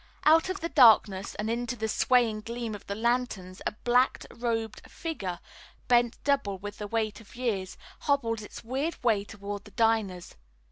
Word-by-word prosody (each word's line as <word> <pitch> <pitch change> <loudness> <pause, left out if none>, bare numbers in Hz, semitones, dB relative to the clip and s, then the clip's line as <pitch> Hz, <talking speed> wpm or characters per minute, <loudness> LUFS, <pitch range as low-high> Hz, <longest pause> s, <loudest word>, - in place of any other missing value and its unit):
Out 320 +3 +5
of 380 +1 -3
the 335 - -2
darkness 220 - +5
and 210 - -3
into 235 +2 -2
the 220 -1 -2
swaying 225 -1 +2
gleam 230 0 -4
of 205 - -9
the 200 - -3
lanterns 225 -5 -1
a - - -2
black 250 +2 +3
robed 225 -2 -2
figure, 195 - -4 0.5
bent 240 -1 +3
double 275 -9 +1
with 205 +2 -8
the 210 - -4
weight 220 0 -2
of 225 - -16
years, 210 -7 -2 0.2
hobbled 235 -6 0
its 210 - -10
weird 270 +8 -2
way 220 -4 +3
toward 205 -1 -7
the - - -13
diners. 210 -4 0
225 Hz, 170 wpm, -28 LUFS, 205-245 Hz, 0.5 s, Out